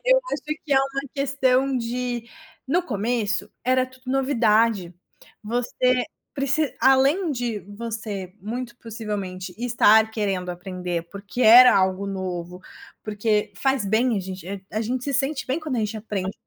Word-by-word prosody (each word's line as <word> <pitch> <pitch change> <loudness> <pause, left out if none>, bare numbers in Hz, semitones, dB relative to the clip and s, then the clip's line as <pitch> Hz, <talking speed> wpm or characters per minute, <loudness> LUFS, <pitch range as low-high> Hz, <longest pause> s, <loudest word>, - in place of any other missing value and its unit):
eu - - +5
acho - - -2 0.2
que 290 - -1
é 270 - +5
uma 275 0 -1
questão 270 -1 +1
de 240 0 -3 0.4
no 340 +7 +2
começo 220 - -1
era 255 +1 +2
tudo 260 0 -17
novidade, 230 -8 +2 0.5
você 245 +2 +1 0.3
preci 280 0 0
além 275 +7 +4
de 240 -5 -2
você 205 -2 -6
muito 235 +4 -5
possivelmente 200 -5 -5
estar 220 -2 +4
querendo 195 -5 -2
aprender, 180 -1 -4
porque 200 +5 -4
era 245 +2 +9
algo 190 +1 +1
novo, 180 -2 -5 0.4
porque 210 0 0
faz 270 -5 0
bem 225 +4 +2
a 195 - 0
gen 185 0 -6 0.4
a 215 - -1
gente 245 +3 -2
se 280 - -2
sente 275 +2 -1
bem 265 +5 -1
quando 300 -5 -3
a - - 0
gente 215 +1 -2
aprende 200 -3 -3
coisas - - -11
230 Hz, 150 wpm, -24 LUFS, 200-260 Hz, 0.5 s, era